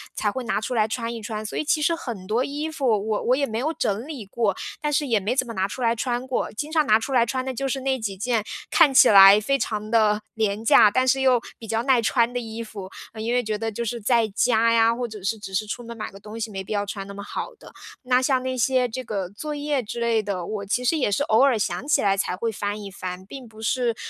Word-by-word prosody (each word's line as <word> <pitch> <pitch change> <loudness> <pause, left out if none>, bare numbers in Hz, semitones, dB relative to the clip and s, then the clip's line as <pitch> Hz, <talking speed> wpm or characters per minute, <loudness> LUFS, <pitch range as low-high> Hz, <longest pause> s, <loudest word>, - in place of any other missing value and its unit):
才 210 - 0
会 260 +2 -4
拿 215 - 0
出 250 - -3
来 220 -3 +3
穿 230 +1 -3
一 230 - -7
穿， 215 0 -5
所 - - -5
以 - - 0
其 310 0 +1
实 335 +3 +2
很 235 - -7
多 235 +4 +1
衣 295 +3 -4
服 285 -3 -4 0.2
我 215 -1 0
我 250 - +3
也 280 - +1
没 220 -4 -4
有 310 +5 -1
整 215 -3 -2
理 280 -9 -7
过， 205 -1 -1 0.3
但 295 - -1
是 295 0 +1
也 230 -4 +2
没 215 +6 -1
怎 260 - +1
么 230 - -6
拿 190 -1 0
出 250 +5 -7
来 230 -1 +3
穿 245 +1 -2
过。 255 - -1
经 290 +8 -4
常 310 -2 +2
拿 215 - +6
出 225 - -5
来 240 -2 +4
穿 255 +2 -2
的 265 - -3
就 275 +2 -2
是 270 - -2
那 265 0 0
几 200 -3 -3
件， 230 +2 0 0.3
看 305 -5 +5
起 265 - +8
来 195 0 +9
非 275 +6 +1
常 215 -4 -3
的 215 -2 +3
廉 215 -1 -1
价， 215 - +7
但 255 +4 +2
是 265 +1 +3
又 255 -3 +4 0.2
比 225 - -10
较 225 +1 0
耐 260 -3 +3
穿 235 +1 +2
的 - - -2
衣 225 -1 -6
服。 200 -4 -9 0.3
因 230 +2 -1
为 250 - +3
觉 215 -1 -2
得 225 +1 -2
就 235 +3 -4
是 235 +1 -4
在 230 0 +2
家 230 -1 +3
呀， 230 0 +4
或 245 0 -3
者 215 -4 -10
是 215 +3 -1
只 195 -2 -9
是 215 +3 0
出 210 - -5
门 235 0 -8
买 215 -1 -6
个 195 - -13
东 215 +2 -10
西 225 -1 -4
没 195 -1 -5
必 - - -4
要 205 -1 0
穿 195 -1 -6
那 200 - -8
么 200 0 -8
好 - - -5
的， - - -15 0.3
那 250 0 +2
像 260 -1 +1
那 260 0 -2
些 250 +1 +2
这 255 +3 -5
个 205 -6 -3
作 295 +10 -6
业 290 -2 -1
之 235 +2 -6
类 230 -2 +2
的， 195 -4 -4
我 210 +1 -4
其 245 +5 -1
实 325 - +3
也 255 -8 0
是 240 - +1
偶 220 -5 +3
尔 270 -4 +4
想 220 +6 -2
起 300 - +3
来 195 -1 +3
才 185 -2 -1
会 225 +4 -2
翻 205 0 -3
一 200 - -7
翻， 185 -1 -7
并 255 +4 -10
不 220 0 -14
是， 230 +3 0
230 Hz, 305 characters per minute, -24 LUFS, 210-255 Hz, 0.3 s, 来